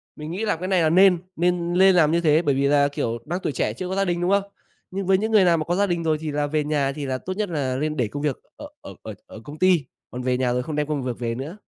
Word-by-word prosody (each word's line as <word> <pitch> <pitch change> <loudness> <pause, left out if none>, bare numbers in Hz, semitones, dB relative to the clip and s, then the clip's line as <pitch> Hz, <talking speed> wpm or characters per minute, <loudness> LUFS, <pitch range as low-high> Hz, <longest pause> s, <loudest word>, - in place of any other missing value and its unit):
mình 150 +1 -7
nghĩ 200 +6 -3
là 210 - +1
cái 180 +3 -5
này 185 -2 +2
là 160 - +3
nên, 185 +1 +5 0.2
nên 175 0 0
lên 190 +1 +5
làm 155 -4 +4
như 170 +1 +2
thế, 155 -1 +3
bởi 145 -5 +1
vì 140 +1 +1
là, 140 0 +4
kiểu, 115 -5 -3
đang 175 +4 -3
tuổi - - -1
trẻ 105 - -1
chưa 180 +10 -6
có 190 - -2
gia 195 0 +1
đình, 175 -1 -1
đúng 180 - +1
không? 200 0 +3 0.5
Nhưng 195 +1 -4
với 190 +1 +4
những 220 +3 -2
người 215 -3 +5
nào 170 -2 +4
mà 155 - -3
có 175 - -1
gia 200 +2 +2
đình 170 -2 -1
rồi 160 -1 +1
thì 155 - -3
là 145 0 -1
về 150 0 0
nhà 145 -2 0
thì 145 -2 -5
là 130 -1 -2
tốt 185 +8 -5
nhất 210 -3 -1
là 140 -5 -2
lên 150 +3 -2
để 120 -4 +1
công 145 +7 -6
việc 145 -4 -1 0.2
ở 295 - -8
ở - - -10
ở - - -7
ở 275 0 -12
công 150 +1 -10
ty, 180 -6 +3 0.3
còn 125 - -6
về 125 0 0
nhà 125 -1 0
rồi 125 0 -1
không 155 - -5
đem 150 -1 -1
công 150 -3 -2
việc 125 -2 -4
về 115 -1 -2
nữa. 150 - -7
155 Hz, 330 wpm, -23 LUFS, 140-180 Hz, 0.5 s, nên